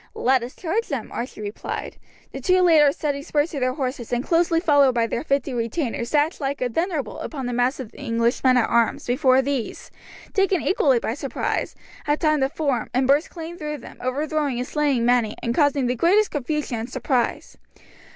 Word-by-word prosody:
"Let 260 0 +2
us 240 +2 -7
charge 395 +7 -2
them," - - -4
Archie 240 -2 -5
replied. 205 0 -5 0.3
The - - -7
two 370 0 +3
leaders, 305 -5 +5
setting 285 -2 -2
spurs 295 +2 0
to 290 - -4
their 255 0 0
horses, 255 -4 -4
and 245 0 0
closely 335 +1 +2
followed 285 -6 +4
by 230 -1 +2
their 235 - -3
fifty 275 -2 0
retainers, 235 0 -2
dashed 300 +2 +1
like 275 0 -2
a 250 - -1
thunderbolt 315 - -2
upon 275 -5 -5
the 245 - -2
mass 245 +3 +1
of 250 -5 -7
the - - -15
English 230 -2 0
men 255 -1 +5
at 240 - +3
arms, 235 +4 +1
before 260 +1 +3
these, 275 -3 -4 0.4
taken 390 -2 +2
equally 275 -8 +3
by 230 - -2
surprise, 275 0 -3 0.3
had 295 0 +1
time 305 -2 +2
to 265 0 +1
form, 280 -6 -1
and 260 +1 +3
burst 285 +4 +3
clean 335 0 -8
through 300 -1 -4
them, 255 - -12
overthrowing 285 +1 -1
and 250 +1 -3
slaying 285 -6 +1
many, 240 -3 +2
and 235 - 0
causing 285 -1 +2
the 245 - +1
greatest 380 - +3
confusion 290 -3 -2
and 225 +3 -5
surprise. 250 -1 -2
275 Hz, 200 wpm, -23 LUFS, 245-305 Hz, 0.4 s, leaders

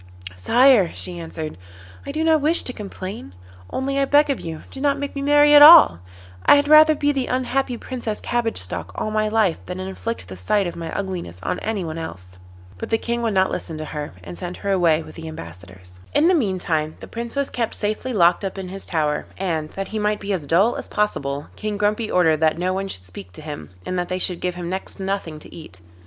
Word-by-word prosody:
'Sire,' 230 - +4
she 175 -1 -4
answered, 160 - -6 0.5
'I - - -3
do 315 +1 -1
not 320 -2 +3
wish 315 +4 +3
to 250 - -4
complain, 190 - -8 0.3
only 275 +1 -2
I 275 - +3
beg 290 +1 +4
of 270 - -2
you 160 -2 -7
do 270 - -8
not 285 0 +2
make 285 0 -5
me 280 - -3
marry 290 +1 +5
at 290 - +9
all. 305 - +10 0.4
I - - +7
had 285 0 +2
rather 310 +1 +7
be 290 0 +1
the 270 -3 -2
unhappy 255 0 -1
Princess 235 -4 -5
Cabbage 240 -2 -1
Stalk 90 0 -3
all 215 - -3
my 215 0 +1
life 215 -6 +1
than 180 0 -5
inflict 190 +5 -5
the 95 - -8
sight 190 - 0
of 175 - -4
my 165 -1 -6
ugliness 180 - -5
on - - -2
anyone 180 -7 -3
else.' 90 - -9 0.4
But - - -5
the 225 - +2
King 235 +1 -3
would 225 -3 -1
not 190 0 +3
listen 160 - -5
to 155 - -5
her, 150 -5 -6
and 85 0 -9
sent 175 +1 -6
her 200 - -3
away 165 -4 +3
with - - -12
the 165 -1 -9
ambassadors. 90 - -11 0.2
In 305 +3 +4
the 370 - +4
meantime 180 - 0
the - - -10
Prince 235 +2 -6
was 280 -1 -1
kept 230 -2 -2
safely 215 +5 -2
locked 175 -4 +3
up 195 0 -4
in 190 -1 -6
his 195 +1 -6
tower, 150 -3 -1
and, 165 -5 -2
that 195 0 -5
he 220 - -3
might 210 0 0
be 200 0 -3
as 160 -7 -3
dull 195 - +3
as - - -4
possible, 145 -9 -2
King 210 -1 -4
Grumpy 210 +2 0
ordered 165 -4 +3
that 160 0 +2
no 180 +2 -1
one 195 +1 -2
should 90 - -6
speak 90 0 -11
to - - -10
him, 145 - -7 0.2
and 185 - -2
that 175 - -3
they 185 - -1
should 180 -1 +2
give 180 -1 -2
him 175 -1 -5
next 190 +2 -5
to 195 - -7
nothing 190 -5 -3
to 150 - -13
eat. 155 - -10
190 Hz, 235 wpm, -22 LUFS, 160-235 Hz, 0.5 s, all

